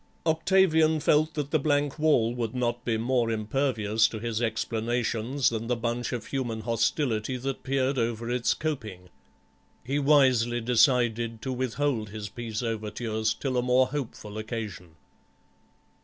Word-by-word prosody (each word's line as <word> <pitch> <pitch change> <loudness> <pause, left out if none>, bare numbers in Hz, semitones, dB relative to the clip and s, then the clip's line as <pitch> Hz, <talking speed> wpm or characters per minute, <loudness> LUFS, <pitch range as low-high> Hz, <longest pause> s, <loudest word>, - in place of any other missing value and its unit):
Octavian 160 -1 +3
felt 155 +1 +2
that 145 -2 -3
the 155 - +3
blank 145 0 0
wall 125 -7 +3
would 120 -1 -3
not 120 -1 -1
be 115 -2 0
more 120 0 +1
impervious 110 -1 +1
to 110 - -6
his 115 0 -3
explanations 115 +3 0
than 115 0 -4
the 125 - +1
bunch 120 +1 -2
of 120 -2 -4
human 120 -5 -3
hostility 115 +1 0
that 135 +2 -4
peered 135 0 0
over 115 0 -2
its 120 0 +1
coping; 110 - -5 0.7
he 140 +4 -1
wisely 130 -5 +4
decided 120 -1 +2
to 130 - -2
withhold 125 -2 -1
his 105 0 -6
peace 115 0 -5
overtures 110 0 -2
till 130 0 -2
a - - +3
more 125 +1 +3
hopeful 110 -6 -5
occasion. 105 -7 -6
120 Hz, 140 wpm, -27 LUFS, 110-135 Hz, 0.7 s, wisely